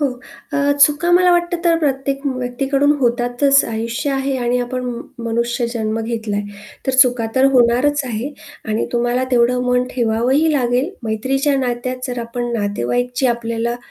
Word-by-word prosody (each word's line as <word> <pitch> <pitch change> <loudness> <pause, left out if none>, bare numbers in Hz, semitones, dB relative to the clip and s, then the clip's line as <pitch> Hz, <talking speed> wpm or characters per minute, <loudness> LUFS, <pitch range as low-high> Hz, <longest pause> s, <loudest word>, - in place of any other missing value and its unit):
हो. 290 - +3 0.5
अ, - - -1 0.3
चुका 300 +4 0
मला 360 +1 +5
वाटतं 345 0 +1
तर 335 -1 +3
प्रत्येक 275 -2 -1
व्यक्तीकडून 270 +2 0
होतातच, 245 +3 +3
आयुष्य 230 +5 -3
आहे 270 0 -1
आणि 245 0 0
आपण 250 +1 -3
म 240 -1 -4 0.2
मनुष्य 235 +1 -1
जन्म 220 -1 -2
घेतला 225 -2 -3 0.5
तर - - +2
चुका 245 -3 -1
तर 260 - +3
होणारच 255 +4 +3
आहे 245 +3 -4 0.4
आणि 215 +1 0
तुम्हाला 240 +1 +1
तेवढं 250 0 +3
मन 250 0 +2
ठेवावंही 250 +6 +1
लागेल. 255 +2 +1
मैत्रीच्या 265 +6 0
नात्यात 255 0 -2
जर 250 -1 -4
आपण 240 +1 -4
नातेवाईक 205 - -1
जी 265 - +2
आपल्याला 235 0 -1
245 Hz, 150 wpm, -18 LUFS, 235-275 Hz, 0.5 s, मला